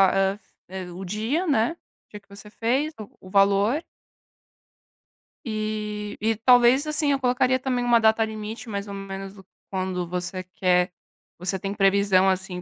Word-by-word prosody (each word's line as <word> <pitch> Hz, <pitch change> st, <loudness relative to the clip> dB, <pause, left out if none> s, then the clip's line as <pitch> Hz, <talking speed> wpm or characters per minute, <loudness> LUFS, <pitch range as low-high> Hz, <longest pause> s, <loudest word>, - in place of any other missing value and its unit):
hã, 195 Hz, +1 st, +1 dB, 0.3 s
eh, 185 Hz, -1 st, -6 dB
o 185 Hz, +2 st, -8 dB
dia, 225 Hz, -, -1 dB
né, 235 Hz, -3 st, +2 dB
o -, -, -32 dB
dia 210 Hz, -, -8 dB
que 200 Hz, -, -37 dB
você 205 Hz, +1 st, -12 dB
fez, 265 Hz, +8 st, -1 dB
o 210 Hz, -, -8 dB, 0.2 s
o -, -, -10 dB
valor 200 Hz, -, +3 dB, 1.6 s
e 215 Hz, -1 st, -4 dB
e 225 Hz, +1 st, +1 dB
talvez 245 Hz, +4 st, +5 dB
assim, 300 Hz, -1 st, +1 dB
eu 275 Hz, -, +1 dB
colocaria 255 Hz, 0 st, +2 dB
também 250 Hz, -2 st, -1 dB
uma 240 Hz, -1 st, +4 dB
data 220 Hz, 0 st, +4 dB
limite, 220 Hz, +1 st, -6 dB
mais 200 Hz, -1 st, -4 dB
ou 200 Hz, -, -6 dB
menos 195 Hz, 0 st, -7 dB, 0.4 s
quando 185 Hz, -2 st, -2 dB
você 180 Hz, +1 st, -4 dB
quer 180 Hz, 0 st, +1 dB, 0.5 s
você 180 Hz, +2 st, -2 dB
tem 195 Hz, +1 st, -3 dB
previsão, 195 Hz, -1 st, +3 dB
assim, 185 Hz, -1 st, -2 dB
210 Hz, 155 wpm, -24 LUFS, 195-235 Hz, 1.6 s, talvez